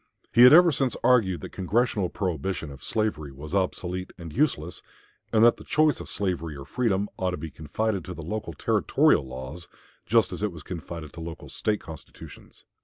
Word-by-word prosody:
He 120 - +6
had 125 - +10
ever 170 +2 +8
since 135 -3 0
argued 105 -8 +3
that - - -8
Congressional 100 0 0
prohibition 90 -4 -3
of 70 -1 -12
slavery 105 -10 -1
was 75 +5 -9
obsolete 90 -1 -2
and 85 -3 -9
useless, 105 - 0 0.5
and 110 0 +4
that 120 - +6
the - - -12
choice 155 -3 +2
of - - -8
slavery 85 -6 -2
or 70 - -8
freedom 100 +3 0
ought 95 - 0
to 90 - -3
be 80 -2 -7
confided 95 +6 -2
to 90 - -7
the 80 - -8
local 95 0 -4
Territorial - - +3
laws, 65 +7 -7 0.4
just - - +3
as - - -5
it 105 -1 0
was 80 -3 -11
confided 85 -3 -7
to 85 - -8
local 80 0 -8
State 105 -1 -1
constitutions. 80 -2 -12
90 Hz, 185 wpm, -26 LUFS, 80-110 Hz, 0.5 s, had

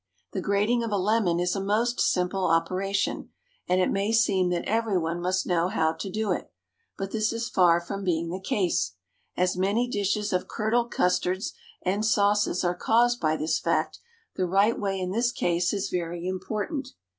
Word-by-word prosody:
The - - -3
grating 210 +4 +1
of 230 - -3
a 205 - +1
lemon 195 -3 +1
is 180 +2 0
a 195 - -2
most 230 +4 0
simple 180 +1 +1
operation, 185 +4 0 0.4
and 180 +1 +3
it 185 - +2
may 200 +2 0
seem 200 -5 +3
that 175 -1 -1
every 225 -2 +1
one 170 0 -2
must 185 +1 0
know 175 -1 +1
how 160 -5 +1
to 165 +4 -6
do 215 +2 -1
it; - - -3 0.5
but 195 0 -4
this 215 -1 0
is 230 0 -3
far 175 -2 +4
from 195 +3 -6
being 170 -2 -1
the 185 - -4
case. 165 - 0 0.4
As 180 +1 +1
many 200 +7 +1
dishes 205 -2 -1
of 180 - 0
curdled 235 +2 0
custards 180 0 0 0.3
and 195 +3 0
sauces 205 -3 +2
are 175 0 +1
caused 240 +6 +2
by 155 -1 +2
this 155 +1 0
fact, - - -1 0.4
the 185 - 0
right 200 +5 +3
way 195 -2 -1
in 185 0 -2
this 235 +4 +1
case 175 -4 0
is 200 -1 -2
very 175 0 -3
important. 215 - -3
195 Hz, 185 wpm, -26 LUFS, 180-215 Hz, 0.5 s, far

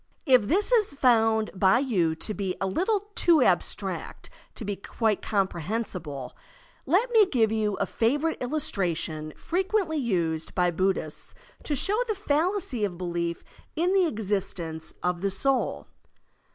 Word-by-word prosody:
If 255 -7 +4
this 400 - +3
is 425 -11 +3
found 225 -4 +3
by 190 +3 +4
you 190 - +1
to 210 +6 -4
be 195 -3 -3
a - - -1
little 395 - -1
too 340 -5 +4
abstract - - -1 0.2
to 225 - -6
be 205 0 -2
quite 215 +1 -1
comprehensible, 180 - -3 0.5
let 405 - +2
me 440 -4 +6
give 230 - +2
you 215 -2 0
a - - -1
favorite 285 +8 0
illustration 175 - -1
frequently 370 -2 -1
used 170 - -1
by 180 -1 +2
Buddhists 180 -3 -2 0.3
to 295 - -2
show 400 - +2
the 435 - -1
fallacy 330 - 0
of 185 -4 -2
belief 170 -1 -3 0.3
in 350 +4 +1
the 380 -3 +4
existence 190 - -3
of 180 -1 -1
the 200 - +1
soul. 260 +8 0
220 Hz, 140 wpm, -26 LUFS, -, 0.5 s, me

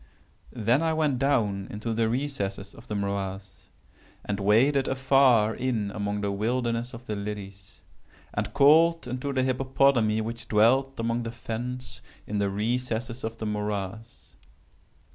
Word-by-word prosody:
"Then 120 +5 +1
I 165 -1 +1
went 150 -5 +1
down 105 -8 +1
into 110 +2 -4
the 110 0 +1
recesses 105 -7 -3
of 115 - -15
the 105 - -3
morass, 100 -1 -4 0.6
and 105 -1 -2
waded 125 +8 +3
afar 130 -4 +4
in 115 -6 -2
among 100 0 -3
the 100 0 -1
wilderness 120 +3 -1
of 120 +1 -11
the 110 - -3
lilies, 100 -1 -7 0.5
and - - -2
called 165 +2 +5
unto 125 +3 -3
the 130 -1 +1
hippopotami 130 -4 +2
which 115 +1 -5
dwelt 130 +5 +3
among 115 +1 0
the 115 -1 -4
fens 125 +2 -6 0.2
in 105 0 -2
the 100 -1 +1
recesses 120 +3 -2
of 110 +1 -4
the 110 - -5
morass. 105 +1 -4
115 Hz, 145 wpm, -27 LUFS, 105-130 Hz, 0.6 s, called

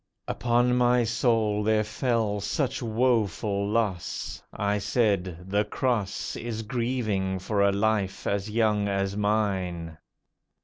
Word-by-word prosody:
Upon 120 +1 +2
my 125 0 +4
soul 115 -2 +1
there 110 0 +2
fell 110 -2 -1
such 125 +8 -1
woeful 110 -4 +1
loss, 105 -6 -2
I 105 0 0
said, 95 -6 0
"The 100 +2 +2
Cross 105 -2 -2
Is 115 -1 -4
grievous 105 -6 -1
for 105 -2 +1
a 100 0 +4
life 100 -1 0
as 100 +1 -1
young 105 -2 +2
as 100 0 -1
mine." 95 -6 -1
105 Hz, 120 wpm, -27 LUFS, 100-115 Hz, -, my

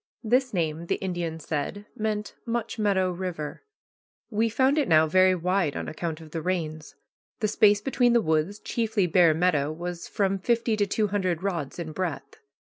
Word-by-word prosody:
This 250 +3 +2
name, 165 -2 -2
the - - +1
Indian 175 -4 -3
said, 160 +7 -4
meant 215 -1 -2
Much 230 -1 -3
Meadow 190 -3 +2
River. 175 -4 -5 0.7
We 225 +2 +1
found 265 +6 +2
it 285 - +1
now 160 -1 +5
very 185 +3 +4
wide 180 -3 0
on - - -4
account 160 0 -4
of 160 -2 -13
the 165 - -3
rains. 160 -3 -3 0.4
The 215 - +1
space 205 0 +4
between 245 0 +2
the 240 - +5
woods, 160 +2 0
chiefly 220 -3 0
bare 170 -2 +4
meadow, 155 -4 +2
was 175 +2 -6
from 195 -1 0
fifty 230 +2 +1
to 205 -1 +1
two 210 +1 0
hundred 185 -4 -1
rods 170 -8 -3
in 165 -3 -5
breadth. 155 -5 -4
185 Hz, 175 wpm, -26 LUFS, 160-210 Hz, 0.7 s, now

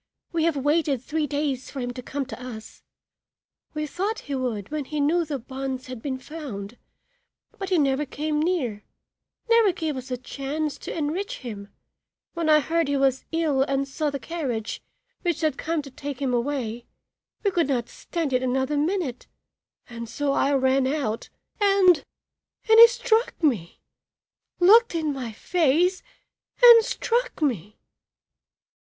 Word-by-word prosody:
We 330 -1 +1
have 335 -3 +2
waited 290 -1 +1
three 305 +1 -1
days 285 -3 -2
for 275 - -7
him 245 -1 -3
to 250 - -7
come 275 +2 -4
to 240 +1 -9
us. 225 -3 -9 0.9
We 305 0 -1
thought 390 +8 -3
he 285 - -6
would 245 -5 -3
when 305 -2 -2
he 300 +2 -4
knew 320 +5 +2
the 300 -3 -3
bonds 260 +1 -5
had 255 -3 -8
been 265 -1 -3
found, 250 -7 -8 0.8
but 390 -1 -4
he 370 - +3
never 280 -1 +1
came 300 +2 -2
near, 300 - -1 0.6
never 460 -3 +5
gave 320 -4 -3
us 260 0 -7
a 250 - -2
chance 280 +4 -4
to - - -6
enrich 325 +7 -3
him; 205 -4 -6
and - - -33 0.6
when 335 -2 -1
I 305 0 +6
heard 330 +1 0
he 285 0 +1
was 270 -1 +1
ill 320 -5 +1
and 275 0 0
saw 300 +2 -1
the 280 - -3
carriage 255 -6 -4 0.4
which 345 -3 -1
had 310 -4 +1
come 320 0 -2
to 275 - -11
take 280 +1 -6
him 265 -3 -1
away, 240 -2 -2 0.6
we 400 - +2
could 340 -5 +1
not 245 -4 0
stand 325 -6 -4
it 255 - +2
another 265 +3 0
minute 305 -5 -1 0.6
and 235 -1 -7
so 280 +4 -1
I 275 - +2
ran 265 0 +3
out 265 -6 -2 0.3
and 390 -5 +5 0.6
and 445 0 +7
he 465 - +12
struck 465 -1 +1
me! 220 - 0 0.8
looked 435 +3 +6
in 310 -3 0
my 255 -4 -5
face 345 - +1 0.6
and 470 -2 +10
struck - - -1
me!" 215 - -1
285 Hz, 160 wpm, -25 LUFS, 255-330 Hz, 0.9 s, he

